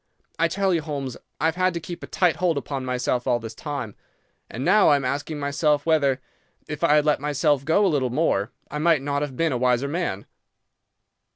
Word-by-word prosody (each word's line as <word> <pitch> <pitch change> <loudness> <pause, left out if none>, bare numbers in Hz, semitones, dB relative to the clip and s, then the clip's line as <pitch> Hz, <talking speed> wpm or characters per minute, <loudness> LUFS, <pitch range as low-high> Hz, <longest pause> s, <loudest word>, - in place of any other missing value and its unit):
I 165 - +4
tell 190 +2 0
you, 165 - +1
Holmes, 140 -4 -4 0.2
I - - 0
have 160 0 +2
had 185 -1 +1
to - - -1
keep 170 +1 -8
a - - -7
tight 180 -3 +1
hold 175 -4 +1
upon 140 -1 -4
myself 125 -1 -1
all 125 -2 +3
this 115 -1 -8
time; 135 -5 -5 0.6
and 130 +4 -5
now 215 - +5
I 145 - +6
am 140 -2 -1
asking 145 +4 -2
myself 145 +1 +1
whether, 140 -5 +2 0.5
if 150 +1 -6
I 150 -3 +5
had 150 0 +3
let 150 - +2
myself 145 -1 +1
go 165 +8 +3
a 185 - +2
little 130 -3 +1
more, 120 -7 +1 0.2
I 150 - -3
might 160 -3 +3
not 140 0 -1
have 140 -4 -4
been 165 -1 +1
a 125 - -1
wiser 125 +2 +2
man. 140 - -3
145 Hz, 215 wpm, -24 LUFS, 130-165 Hz, 0.6 s, I